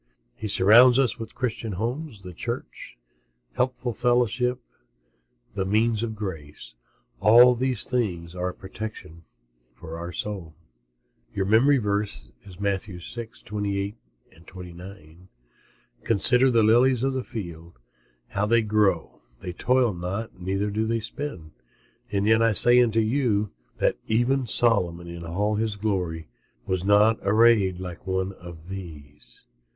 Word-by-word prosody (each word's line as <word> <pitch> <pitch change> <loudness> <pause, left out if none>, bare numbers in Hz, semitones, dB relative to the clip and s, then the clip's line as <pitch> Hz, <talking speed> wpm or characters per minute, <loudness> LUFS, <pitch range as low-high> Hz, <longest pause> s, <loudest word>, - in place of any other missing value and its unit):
He 110 - -6
surrounds 115 +6 +6
us 130 -5 +1
with 115 -1 -8
Christian 115 -4 -3
homes, 115 - -4
the 90 -1 -9
Church, - - -7 0.6
helpful 125 - -1
fellowship, 125 +1 +1 0.9
the 100 -1 -2
means 110 +3 +1
of 115 -2 -3
grace. 80 -12 -8 0.5
All 120 +4 +7
these 125 -2 -2
things 90 -9 -2
are 90 0 -2
a - - -7
protection 95 -4 -9 0.5
for 80 +4 -8
the - - -6
soul. 90 -6 -6 0.8
MEMORY 110 +9 +3
VERSE, 105 -3 -3 0.3
Matthew 100 -1 -2
6: 115 +5 -8
28, 100 -1 -3 0.5
29 90 -1 -12 0.8
"Consider 125 +4 +3
the 115 -3 +3
lilies 120 +3 +4
of 135 0 0
the 130 -1 -2
field, 85 - -8 0.5
how 105 +1 -1
they 115 +1 +3
grow; 105 -5 0 0.2
they 90 - -6
toil 125 +3 +1
not, 90 +3 -5
neither 95 +3 -2
do 110 +2 -1
they 115 0 0
spin; 110 - -6 0.6
and 100 0 0
yet 110 +1 +4
I 115 -1 +3
say 120 +4 +8
unto 115 -2 +2
you, 110 -3 0 0.3
that - - +1
even 120 +3 +1
Solomon 90 -8 +2
in 85 0 -8
all 100 +6 -1
his 110 -1 -1
glory 90 -6 -3 0.4
was 95 -1 -2
not 105 +3 +4
arrayed 100 -3 +3
like 90 0 -8
one 95 0 -1
of 85 -3 -12
these." 75 -8 -10
105 Hz, 130 wpm, -25 LUFS, 90-115 Hz, 0.9 s, say